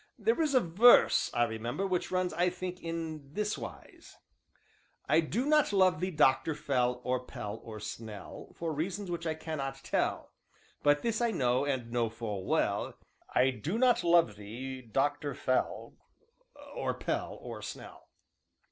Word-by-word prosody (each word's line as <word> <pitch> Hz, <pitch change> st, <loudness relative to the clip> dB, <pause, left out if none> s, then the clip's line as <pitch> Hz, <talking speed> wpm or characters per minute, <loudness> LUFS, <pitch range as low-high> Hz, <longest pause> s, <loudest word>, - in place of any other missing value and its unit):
"There 450 Hz, -7 st, +1 dB
is 300 Hz, -4 st, +1 dB
a -, -, +8 dB
verse, 215 Hz, +5 st, +6 dB
I 120 Hz, -, +2 dB
remember, 120 Hz, -, -2 dB
which 185 Hz, -2 st, -1 dB
runs, 185 Hz, -1 st, 0 dB
I 175 Hz, +1 st, +2 dB
think, 180 Hz, 0 st, -6 dB
in 160 Hz, -4 st, -5 dB
this 210 Hz, +2 st, -1 dB
wise: -, -, -10 dB, 0.9 s
"'I 155 Hz, -, +5 dB
do 195 Hz, -, -1 dB
not 300 Hz, -3 st, +4 dB
love 185 Hz, -4 st, +4 dB
thee, 185 Hz, +2 st, -1 dB
Doctor 150 Hz, -1 st, +3 dB
Fell, 125 Hz, -4 st, 0 dB
or 125 Hz, 0 st, -1 dB
Pell, 105 Hz, -3 st, -6 dB
or 110 Hz, -2 st, -8 dB
Snell, 105 Hz, 0 st, -8 dB
For 165 Hz, -2 st, -3 dB
reasons 180 Hz, +5 st, -3 dB
which 170 Hz, -1 st, -3 dB
I 160 Hz, -, -1 dB
cannot 140 Hz, -4 st, -5 dB
tell; -, -, -1 dB, 0.5 s
But 145 Hz, 0 st, +3 dB
this 230 Hz, -1 st, 0 dB
I 235 Hz, -, +3 dB
know, 130 Hz, -, +1 dB
and 130 Hz, -5 st, -2 dB
know 120 Hz, -2 st, +1 dB
full 105 Hz, -4 st, -5 dB
well, -, -, 0 dB, 0.4 s
I 130 Hz, +1 st, +5 dB
do 160 Hz, -, -3 dB
not 245 Hz, -1 st, +4 dB
love 170 Hz, -11 st, +4 dB
thee, 125 Hz, +6 st, -7 dB
Doctor 145 Hz, +5 st, -1 dB
Fell, 130 Hz, -, -1 dB, 0.8 s
or -, -, -2 dB
Pell, -, -, -3 dB
or -, -, -8 dB
Snell.'" -, -, -9 dB
150 Hz, 155 wpm, -31 LUFS, 125-185 Hz, 0.9 s, a